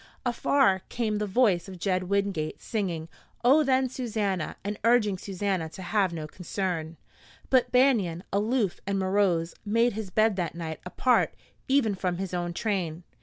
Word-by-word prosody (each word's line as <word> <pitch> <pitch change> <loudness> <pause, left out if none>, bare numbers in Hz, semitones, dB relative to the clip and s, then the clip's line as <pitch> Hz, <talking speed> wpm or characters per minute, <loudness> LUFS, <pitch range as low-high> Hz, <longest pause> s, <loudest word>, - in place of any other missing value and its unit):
Afar 240 -5 +3
came 215 -3 -1
the 210 - -1
voice 195 -4 +2
of 190 -1 -8
Jed 185 0 0
Wingate 200 -6 -1
singing, 175 -7 -3 0.4
"Oh, 285 +5 +6
then 265 -1 +2
Susannah," 210 -9 -2
and 205 +1 -4
urging 230 -4 +4
Susannah 190 -4 -2
to 185 - -9
have 195 0 +1
no 160 -2 -5
concern. 170 -1 -4 0.5
But 250 -2 +4
Banion, 225 -10 +3
aloof 210 -1 +1
and 200 0 0
morose, 185 -3 +1
made 230 +3 +2
his 215 -2 -5
bed 215 +1 +2
that 170 -3 -2
night 160 -2 -5
apart 250 +7 +2 0.3
even 265 -6 +3
from 180 -2 -2
his 190 -1 -4
own 175 -1 -1
train. 175 -4 -2
195 Hz, 155 wpm, -27 LUFS, 175-225 Hz, 0.5 s, Oh